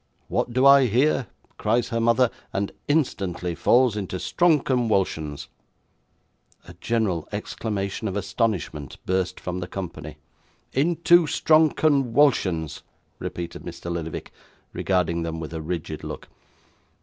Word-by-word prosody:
"What -, -, 0 dB
do 130 Hz, +3 st, +2 dB
I 140 Hz, -1 st, +8 dB
hear?" 130 Hz, +2 st, +2 dB, 0.3 s
cries 120 Hz, +1 st, +1 dB
her 115 Hz, -1 st, -1 dB
mother; 115 Hz, +1 st, +3 dB, 0.2 s
and 100 Hz, 0 st, -2 dB, 0.2 s
instantly 95 Hz, -, 0 dB
falls 120 Hz, +5 st, +3 dB
into 95 Hz, -3 st, -3 dB
strong 170 Hz, -, +3 dB
conwulsions.' 95 Hz, -, 0 dB, 1.2 s
A 90 Hz, -, -10 dB
general 105 Hz, -9 st, -1 dB
exclamation 100 Hz, -1 st, -3 dB
of 100 Hz, 0 st, -2 dB
astonishment 95 Hz, -, -2 dB
burst 95 Hz, 0 st, -1 dB
from 90 Hz, 0 st, -4 dB
the 90 Hz, -, -5 dB
company. 80 Hz, -6 st, -7 dB, 0.6 s
'Into 170 Hz, +3 st, +4 dB
strong 155 Hz, +1 st, +4 dB
conwulsions,' 130 Hz, -, +2 dB, 0.4 s
repeated 85 Hz, -1 st, -5 dB
Mr. 85 Hz, -, -7 dB
Lillyvick, 80 Hz, -2 st, -5 dB, 0.4 s
regarding 90 Hz, -3 st, 0 dB
them 80 Hz, 0 st, -3 dB
with 80 Hz, 0 st, -6 dB
a 80 Hz, -, -4 dB
rigid 80 Hz, -1 st, -4 dB
look. -, -, -7 dB
100 Hz, 120 wpm, -24 LUFS, 85-130 Hz, 1.2 s, I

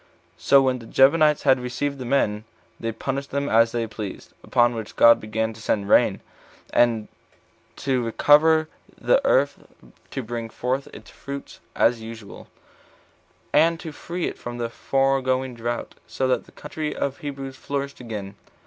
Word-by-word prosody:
So 140 Hz, 0 st, +5 dB
when 130 Hz, -1 st, +1 dB
the 115 Hz, -, -12 dB
Gibeonites 150 Hz, +2 st, +4 dB
had 135 Hz, -2 st, +4 dB
received 135 Hz, +3 st, -3 dB
the 130 Hz, -, -5 dB
men, 110 Hz, -5 st, +1 dB, 0.4 s
they 115 Hz, -, -2 dB
punished 135 Hz, +5 st, -4 dB
them 140 Hz, +1 st, -2 dB
as 115 Hz, -1 st, +4 dB
they 120 Hz, -1 st, -1 dB
pleased; 105 Hz, -3 st, -8 dB
upon 120 Hz, 0 st, +3 dB
which 110 Hz, -2 st, -7 dB
God 115 Hz, 0 st, +7 dB
began 110 Hz, +1 st, -2 dB
to 110 Hz, -, -13 dB
send 100 Hz, -2 st, -1 dB
rain, -, -, +4 dB, 0.5 s
and 115 Hz, -3 st, +3 dB, 0.7 s
to 130 Hz, -2 st, 0 dB
recover 155 Hz, +7 st, +4 dB, 0.3 s
the -, -, +3 dB
earth -, -, +2 dB, 0.5 s
to 135 Hz, -, -4 dB
bring 115 Hz, 0 st, -5 dB
forth 130 Hz, +4 st, -2 dB
its -, -, -13 dB
fruits 140 Hz, 0 st, -8 dB, 0.2 s
as 115 Hz, -1 st, +2 dB
usual, 110 Hz, -2 st, -10 dB, 1.1 s
and 165 Hz, +2 st, +4 dB
to 160 Hz, -, -7 dB
free 175 Hz, +4 st, -5 dB
it -, -, -5 dB
from 120 Hz, 0 st, -6 dB
the 120 Hz, -1 st, -2 dB
foregoing 130 Hz, 0 st, 0 dB
drought, 120 Hz, 0 st, -4 dB
so 130 Hz, -, -1 dB
that 125 Hz, -2 st, 0 dB
the -, -, -17 dB
country 155 Hz, -4 st, -5 dB
of 140 Hz, -1 st, -2 dB
the -, -, -22 dB
Hebrews 135 Hz, -2 st, -6 dB
flourished 140 Hz, +1 st, -4 dB
again. 105 Hz, -5 st, -6 dB
130 Hz, 160 wpm, -23 LUFS, 115-140 Hz, 1.1 s, God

